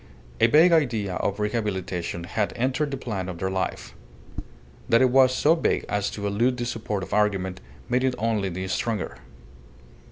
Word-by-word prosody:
A - - +6
vague 160 +8 +6
idea 115 - +1
of 100 +1 -2
rehabilitation 95 -6 -2
had 105 +4 -2
entered 130 +5 0
the 135 - -4
plan 100 -8 -4
of 90 - -6
their 95 +2 -2
life. 95 -1 -3 1.0
That 115 - +5
it 130 - +3
was 130 0 +6
so 145 +5 +3
vague 165 - 0
as 105 -1 -1
to 105 - -6
elude 115 +5 +1
the 120 - -2
support 115 -4 -3
of - - -7
argument 95 -3 0 0.3
made 125 +1 +1
it 130 -1 +1
only 110 -3 0
the 95 +1 -4
stronger. 105 +1 -2
105 Hz, 170 wpm, -25 LUFS, 95-125 Hz, 1.0 s, A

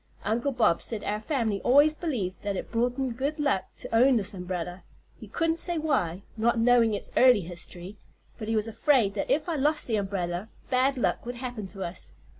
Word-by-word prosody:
Uncle 235 +7 0
Bob 220 -9 +2
said 220 -3 -5
our 210 +1 -2
fam'ly 220 -4 -1
always 290 +5 +5
believed 250 - -3
that 200 -1 -2
it - - -6
brought 245 +2 0
'em 265 -3 -1
good 280 +6 -3
luck 280 -10 +1
to - - -6
own 255 +2 +5
this 205 0 -1
umbrella. 180 -1 -5 0.4
He - - -10
couldn't 330 0 0
say 345 0 0
why, 205 - 0
not 235 +2 +1
knowing 230 -2 +4
its - - -7
early 250 -5 +6
history, 175 +3 -7 0.4
but 215 - -5
he 225 - 0
was 215 0 +1
afraid 225 -3 +2
that - - -3
if 305 +3 +1
I 330 -3 -1
lost 300 +2 +1
the 225 -3 0
umbrella 190 -1 -3 0.2
bad 260 +2 +2
luck 245 - 0
would 245 - -4
happen 245 -5 -5
to 195 0 -7
us. 170 - -6
230 Hz, 205 wpm, -27 LUFS, 195-270 Hz, 0.4 s, early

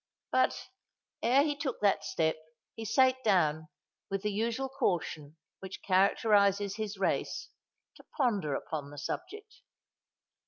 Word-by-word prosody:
But, - - +1 0.5
ere 260 +4 +4
he 295 -1 0
took 280 -4 -3
that 195 -7 +3
step, 160 +1 0 0.4
he 225 - -6
sate 260 +3 +3
down, 160 -7 +2 0.4
with 195 0 -2
the 210 - 0
usual 230 +5 -1
caution 170 - -2 0.2
which 190 0 -9
characterises 200 +1 +3
his 215 -2 -4
race, 190 - -1 0.5
to - - -16
ponder 205 - +1
upon 145 -1 -4
the 145 - -11
subject. 420 - -6
200 Hz, 125 wpm, -31 LUFS, 165-245 Hz, 0.5 s, ere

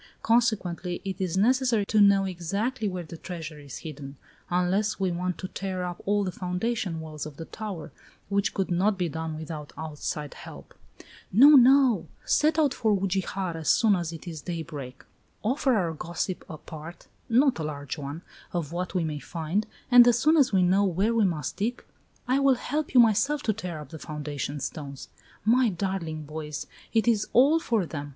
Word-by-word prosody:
Consequently, 190 -7 +1
it 190 0 -4
is 185 -1 -1
necessary 240 0 +3
to 215 +1 +3
know 200 -1 +5
exactly 200 +7 -2
where 180 -2 -4
the 165 0 -10
treasure 160 -3 -7
is 140 -3 -9
hidden, 140 -3 -8 0.3
unless 185 +5 +1
we 190 -2 +1
want 180 +1 -2
to 185 - -5
tear 185 -1 -4
up 175 -1 -5
all 205 0 +2
the 185 - -2
foundation 180 0 -2
walls 155 -2 -6
of 150 -1 -12
the 165 - -6
tower, 190 -6 -7 0.4
which 200 0 +1
could 190 -2 -2
not 195 +4 +2
be 180 -2 0
done 160 0 -4
without 155 -1 -7
outside 150 -1 -5
help." - - -11 0.6
"No 255 +10 +8
no; 265 -3 +6 0.2
set 310 +1 +3
out 295 -5 +3
for 220 - +1
Ugijar 190 -1 -2
as 160 -1 -3
soon 220 -4 +5
as 170 -3 -3
it 165 +2 -9
is 160 -3 -6
daybreak. 155 -7 -6 0.4
Offer 260 +3 +2
our 175 -6 0
gossip 175 +3 -4
a 155 - -7
part 160 +3 -10 0.2
not 255 - +4
a - - -2
large 145 -2 -4
one 145 +4 -6 0.3
of 165 -4 -2
what 180 +2 -4
we 180 - +2
may 155 -2 -3
find, 170 +7 -2 0.2
and 245 -1 +9
as 240 -1 +5
soon 310 +6 +4
as 275 -6 +4
we 190 -2 +3
know 190 +3 +4
where 195 +4 +1
we 225 -3 +3
must 155 -6 -2
dig, 230 +5 -2 0.4
I 260 +2 +3
will 275 -1 +4
help 295 +3 -3
you - - +8
myself 240 +6 +4
to 215 - +1
tear 180 -7 -6
up 150 -3 -10
the 160 - -9
foundation 145 -1 -5
stones. 140 -2 -6 0.4
My 240 +2 +4
darling 175 -4 -3
boys! 150 0 -6 0.3
It 225 0 +2
is 220 -3 +2
all 285 +7 +6
for 225 - 0
them! 145 -3 -6
185 Hz, 190 wpm, -27 LUFS, 160-220 Hz, 0.6 s, and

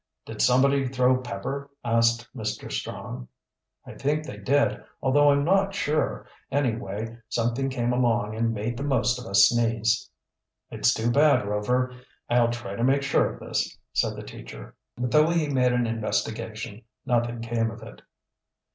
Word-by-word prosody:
"Did - - -5
somebody 135 +2 +4
throw 125 0 +3
pepper?" 130 +4 -5 0.2
asked 115 0 +2
Mr. 110 -3 -4
Strong. 60 - -5 0.6
"I - - -9
think 150 +2 -1
they 105 - -8
did, 140 +8 +1 0.2
although 145 +2 +4
I'm 140 0 +3
not 195 +2 +2
sure. 155 -5 -1 0.3
Anyway, 115 -4 -2
something 120 +4 0
came 125 -2 -1
along 115 -4 +1
and 115 +1 0
made 115 +2 -3
the 140 - -4
most 125 -3 +1
of 125 - -9
us 100 0 +6
sneeze." 115 +1 +1 0.6
"It's - - +2
too 115 +2 0
bad, 145 -3 +4
Rover. 125 +5 0 0.4
I'll 120 -1 +4
try 120 -4 -5
to 115 - -2
make 135 +2 +3
sure 140 - +2
of - - -11
this," - - -2 0.2
said - - +1
the - - -7
teacher. - - -10 0.2
But 125 0 -2
though 155 +1 +5
he 165 -3 +1
made 125 -2 +2
an 125 -1 +1
investigation 110 0 -3 0.2
nothing 120 -1 0
came 115 0 -1
of 115 0 -10
it. 115 - -12
120 Hz, 160 wpm, -26 LUFS, 115-135 Hz, 0.6 s, us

